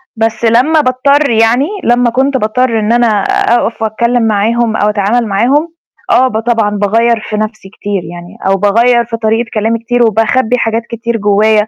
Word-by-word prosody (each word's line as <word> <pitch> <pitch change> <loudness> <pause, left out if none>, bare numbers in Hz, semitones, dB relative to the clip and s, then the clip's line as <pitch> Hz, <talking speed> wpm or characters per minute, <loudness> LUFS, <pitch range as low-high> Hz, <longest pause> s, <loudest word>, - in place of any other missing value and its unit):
بس 225 +1 -2
لمّا 265 +8 +3
باضطر 280 +2 +1
يعني 230 +5 +2 0.2
لمّا 240 0 +2
كنت 265 +3 0
باضطر 230 +1 0
إن 215 +1 -1
أنا 240 0 +2 0.2
أقف 235 -1 0
وأتكلّم 235 +2 0
معاهم 220 +2 0
أو 210 - +1
أتعامل 210 +3 0
معاهم، 265 +11 0 0.4
آه، 260 - +4
ب 220 -4 -2
طبعًا 225 -2 0
باغيّر 225 +3 +1
في 215 - -3
نَفْسي 215 -2 -5
كتير 200 -2 -4
يعني، 175 +4 -11
أو 195 - +3
باغيّر 235 +4 +2
في 230 -1 -5
طريقة 225 +1 -1
كلامي 225 +1 -1
كتير 240 +1 0
وباخبّي 225 +3 +1
حاجات 225 -1 -1
كتير 230 0 -3
جوّايا، 210 +1 +2
230 Hz, 170 wpm, -11 LUFS, 215-240 Hz, 0.4 s, آه